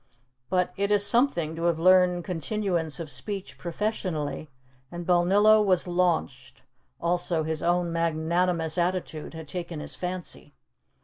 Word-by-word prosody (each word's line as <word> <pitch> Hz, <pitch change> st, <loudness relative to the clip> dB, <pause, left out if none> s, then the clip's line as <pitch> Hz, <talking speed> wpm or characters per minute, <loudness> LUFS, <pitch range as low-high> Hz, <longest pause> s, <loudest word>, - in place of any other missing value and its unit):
But 180 Hz, 0 st, +1 dB
it 200 Hz, +1 st, 0 dB
is 205 Hz, -1 st, +3 dB
something 200 Hz, -, +1 dB
to 165 Hz, +1 st, -3 dB
have 170 Hz, -2 st, +2 dB
learned 180 Hz, 0 st, +4 dB
continuance 175 Hz, -2 st, -2 dB
of 165 Hz, -, -5 dB
speech 185 Hz, +9 st, -5 dB
professionally, 170 Hz, -5 st, -3 dB, 0.4 s
and 175 Hz, 0 st, -6 dB
Balnillo 200 Hz, +5 st, +5 dB
was 185 Hz, -3 st, +2 dB
launched; 175 Hz, -2 st, -1 dB, 0.4 s
also 170 Hz, -1 st, 0 dB
his 160 Hz, 0 st, -2 dB
own 175 Hz, 0 st, +1 dB
magnanimous 165 Hz, +1 st, 0 dB
attitude 170 Hz, -3 st, -2 dB
had 160 Hz, -1 st, -8 dB
taken 170 Hz, -1 st, -5 dB
his -, -, -6 dB
fancy. 180 Hz, -, -6 dB
175 Hz, 130 wpm, -26 LUFS, 165-185 Hz, 0.4 s, Balnillo